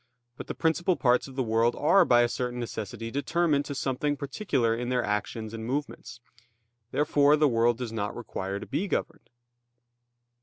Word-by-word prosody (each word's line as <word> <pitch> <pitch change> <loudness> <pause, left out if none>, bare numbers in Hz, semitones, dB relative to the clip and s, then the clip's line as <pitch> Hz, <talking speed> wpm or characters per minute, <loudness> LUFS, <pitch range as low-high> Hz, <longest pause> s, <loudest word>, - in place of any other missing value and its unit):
But - - -9
the - - -5
principal 175 +3 +1
parts 125 -3 +2
of 135 - -12
the 130 - 0
world 115 +1 +2
are 180 +5 +4
by 120 -4 +5
a - - +3
certain 125 0 -3
necessity 115 -1 -5
determined 145 +1 +1
to 140 - -5
something 135 +2 -1
particular 135 - 0
in 120 +1 -3
their 125 -1 +1
actions 105 +2 -3
and 110 -1 -6
movements. 125 -1 -4 0.7
Therefore 145 +1 +3
the 150 0 +4
world 120 -2 +2
does 120 -2 -5
not 105 -2 -3
require 100 -4 -4
to - - -8
be 155 +9 -2
governed. - - -3
125 Hz, 175 wpm, -27 LUFS, 115-145 Hz, 0.7 s, by